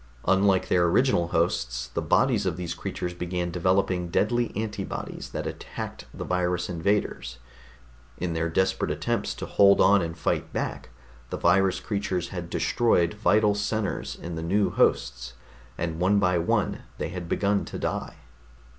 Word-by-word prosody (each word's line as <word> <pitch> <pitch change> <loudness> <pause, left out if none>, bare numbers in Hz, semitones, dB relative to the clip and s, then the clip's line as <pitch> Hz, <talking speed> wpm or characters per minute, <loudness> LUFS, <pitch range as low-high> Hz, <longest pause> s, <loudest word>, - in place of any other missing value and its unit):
Unlike 95 0 +3
their 90 -1 +4
original 85 -1 +3
hosts, 60 -8 -1
the - - -3
bodies 110 -7 +2
of 90 -1 -1
these 85 -2 -3
creatures 90 0 -4
began 90 0 -3
developing 90 0 +1
deadly 120 +6 +1
antibodies 105 0 -4
that - - -4
attacked - - -6
the - - -6
virus 90 -1 -1
invaders. 85 -8 -1 0.8
In 90 -2 -2
their 80 0 -1
desperate 95 +3 +1
attempts - - -1
to - - -5
hold 100 0 +5
on 100 0 +6
and 80 0 -4
fight 80 - -1
back, - - -4 0.4
the - - -3
virus 95 +2 +3
creatures 95 -4 -2
had 90 -3 -6
destroyed 90 -7 +2
vital 105 0 +3
centers 105 0 -2
in 85 - -7
the 80 - -4
new 100 +5 +1
hosts, - - +1 0.4
and 80 -1 -3
one 95 +3 +3
by 90 -3 +3
one 85 - 0 0.2
they - - -3
had 90 -2 -6
begun 100 0 +1
to - - -6
die. - - -3
90 Hz, 155 wpm, -26 LUFS, 85-100 Hz, 0.8 s, on